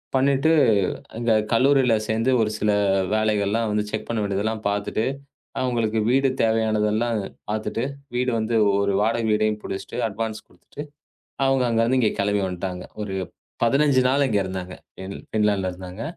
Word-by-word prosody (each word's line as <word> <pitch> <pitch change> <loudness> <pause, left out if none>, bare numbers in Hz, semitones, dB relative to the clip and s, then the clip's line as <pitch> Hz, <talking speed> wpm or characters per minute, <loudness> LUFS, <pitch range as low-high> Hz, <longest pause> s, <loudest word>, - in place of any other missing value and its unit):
பண்ணிவிட்டு 135 +3 +3 0.7
அங்க 115 0 +1 0.2
கல்லூரியில் 125 -3 +3
சேர்ந்து 115 +4 +1
ஒரு 110 -1 +1
சில 105 0 +1 0.4
வேலைகள் 110 -2 +1
எல்லாம் 115 +1 0
வந்து 105 0 0
செக் 110 0 -4
பண்ண 115 -1 -1
வேண்டியதெல்லாம் 105 +2 -2
பார்த்துவிட்டு, 105 +2 -1 0.6
அவங்களுக்கு 115 -3 0
வீடு 135 +2 +3
தேவையானது 110 -1 +2
எல்லாம் 115 0 0 0.3
பார்த்துவிட்டு, 110 +2 -2 0.3
வீடு 125 +1 +1
வந்து 110 +1 -1 0.2
ஒரு 100 0 +1
வாடகை 115 +1 +1
வீட்டையும் 105 0 +1
பிடித்துவிட்டு 115 +5 -4
அட்வான்ஸ் 110 +1 -5
கொடுத்துவிட்டு 145 - -11 0.6
அவங்க 135 -1 +2
அங்க 115 -1 +1
இருந்து 130 +2 +2
இங்கே 110 -3 +2
கிளம்பி 100 0 +1
வந்துவிட்டாங்க. 90 0 -5 0.2
ஒரு 100 -2 -4 0.5
15 140 +2 +3
நாள் 140 +2 +3
இங்கே 105 -4 +1
இருந்தாங்க. 95 -1 -5 0.2
பின் 95 +1 -7
பின்லாந்தில் 105 -3 +1
இருந்தாங்க. 90 +3 -8
110 Hz, 150 wpm, -23 LUFS, 105-120 Hz, 0.7 s, பண்ணிவிட்டு